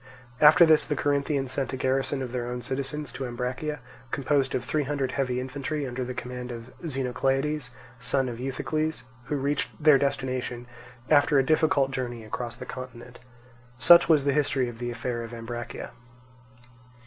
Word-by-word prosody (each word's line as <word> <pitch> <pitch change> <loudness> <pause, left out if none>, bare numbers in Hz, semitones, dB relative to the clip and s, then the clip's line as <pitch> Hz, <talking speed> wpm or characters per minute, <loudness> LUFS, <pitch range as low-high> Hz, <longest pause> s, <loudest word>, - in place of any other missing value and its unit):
After 150 +2 +8
this 155 -2 +5
the 150 - -2
Corinthians 140 -2 0
sent 135 -1 -2
a - - -2
garrison 135 +1 0
of 125 - -5
their 120 -1 -3
own 125 0 -4
citizens 140 +3 -2
to 130 - -4
Ambracia, 125 +5 -3 0.3
composed 140 0 +1
of 125 - -2
three 155 - 0
hundred 140 -2 -1
heavy 130 -3 -1
infantry, 140 +3 -3
under 130 0 -3
the 125 0 -5
command 125 0 -6
of 115 +1 -9
Xenocleides, 135 0 -1 0.3
son 130 +2 +1
of 120 -1 -5
Euthycles, 155 +4 -2 0.2
who 150 - -2
reached 140 +1 0
their 150 -3 +7
destination 130 -3 -2 0.5
after 145 -1 +5
a 135 - +4
difficult 155 -3 +3
journey 120 -3 -4
across 115 +2 -5
the - - -8
continent. 125 -1 -9 0.6
Such 170 +6 +7
was 150 -4 +5
the 140 - +3
history 135 -3 +1
of 120 -1 -8
the 120 0 -3
affair 120 0 -3
of 115 0 -7
Ambracia. 120 +1 -6
130 Hz, 165 wpm, -27 LUFS, 125-145 Hz, 0.6 s, After